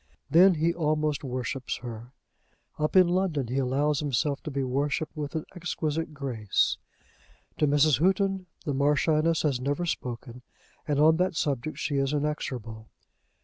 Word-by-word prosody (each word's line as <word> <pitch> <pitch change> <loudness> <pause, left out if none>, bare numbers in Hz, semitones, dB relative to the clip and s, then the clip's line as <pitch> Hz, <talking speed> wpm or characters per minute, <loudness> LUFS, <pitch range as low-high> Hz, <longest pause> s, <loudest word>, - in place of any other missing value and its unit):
Then 180 +3 +7
he 165 +2 +1
almost 155 -3 0
worships 130 0 -3
her. 120 0 -8 0.7
Up 150 +3 -1
in 185 -2 +7
London 175 -8 0
he 130 +2 0
allows 140 +3 +1
himself 140 0 0
to - - -6
be 140 -1 -2
worshipped 140 +4 -1
with 150 0 -5
an 160 - -2
exquisite 160 -2 -2
grace. 130 -8 0 0.8
To 150 - +3
Mrs. 145 -2 +4
Houghton 190 +1 +1 0.2
the 145 - -1
Marchioness 150 +3 +2
has 135 -5 0
never 145 +6 -1
spoken, 125 -5 -5 0.5
and 145 -2 +1
on 160 +2 +5
that 180 0 0
subject 145 -1 -2
she 145 - -1
is 135 +1 +1
inexorable. 125 -7 -3
150 Hz, 145 wpm, -27 LUFS, 135-160 Hz, 0.8 s, Then